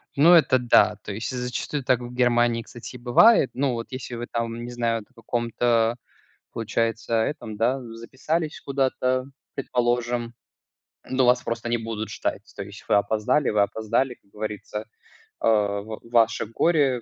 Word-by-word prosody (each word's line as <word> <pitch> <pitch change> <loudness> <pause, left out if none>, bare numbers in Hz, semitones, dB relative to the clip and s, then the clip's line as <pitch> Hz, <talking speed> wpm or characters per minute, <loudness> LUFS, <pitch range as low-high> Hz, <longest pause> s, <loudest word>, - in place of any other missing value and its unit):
Ну, 165 +5 +7
это 150 -6 +5
да, 115 -3 +4
то 105 - -6
есть 110 +4 -4
зачастую 125 +3 -3
так 125 -1 +2
в 120 0 -8
Германии, 120 -1 +2
кстати, 120 +2 -10
и - - -6
бывает. 130 - +5
Ну, 135 -1 +1
вот 115 0 -4
если 130 -1 -6
вы 120 +1 -5
там, 115 0 -3
не 120 - -6
знают, 115 -3 -2
о - - -31
каком-то 115 0 0 0.6
получается 115 0 -1
этом, 110 -2 -1
да, 125 +4 +2 0.2
записались 150 +7 -3
куда-то, 130 -1 0 0.3
предположим, 120 -2 -1 0.8
ну, 130 -1 +2
вас 125 - +4
просто 115 0 -3
не 120 - +2
будут 110 -1 -5
ждать. - - -3
То 100 - -5
есть 100 +1 -12
вы - - +3
опоздали, 110 +7 +2
вы 105 -1 +3
опоздали, 115 +5 0
как 100 - -34
говорится, 105 0 -5 0.6
э, - - +1
в 105 0 0
ваше 115 -1 +2
горе, 135 +1 +2
120 Hz, 160 wpm, -24 LUFS, 115-130 Hz, 0.8 s, Ну